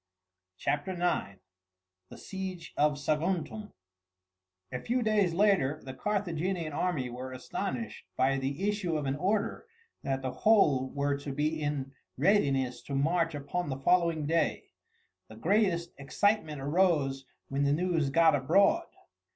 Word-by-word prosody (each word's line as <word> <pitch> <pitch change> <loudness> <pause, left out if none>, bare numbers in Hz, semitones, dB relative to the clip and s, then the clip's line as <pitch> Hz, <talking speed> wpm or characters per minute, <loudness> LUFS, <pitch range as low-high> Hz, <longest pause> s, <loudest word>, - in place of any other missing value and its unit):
CHAPTER 145 - -1
IX: 175 - -1 0.7
THE - - -11
SIEGE 190 -4 -6
OF 150 0 +2
SAGUNTUM 170 +8 -2 1.0
A 125 - -3
few 245 - -1
days 210 -5 +2
later 185 -8 +3
the 130 - -7
Carthaginian 180 -2 -2
army 145 -6 -1
were 130 +2 -6
astonished 195 - -5
by 135 +1 +2
the 140 +9 -2
issue 200 -6 0
of 150 - -3
an 135 0 0
order 200 - -1 0.3
that 135 -1 -2
the 130 - -2
whole 140 - +3
were 140 0 0
to 140 0 -5
be 155 +3 -1
in 145 -2 -2 0.3
readiness 135 -7 +2
to 140 - -4
march 165 +3 +1
upon 145 +4 -3
the 135 - -3
following 170 +1 +2
day. 165 +2 0 0.6
The 110 - -12
greatest 175 - +1
excitement 155 0 0
arose 145 -3 +1 0.3
when 140 +1 0
the 140 - +3
news 165 -2 +1
got 165 +2 +5
abroad. 195 - +3
155 Hz, 135 wpm, -30 LUFS, 135-185 Hz, 1.0 s, got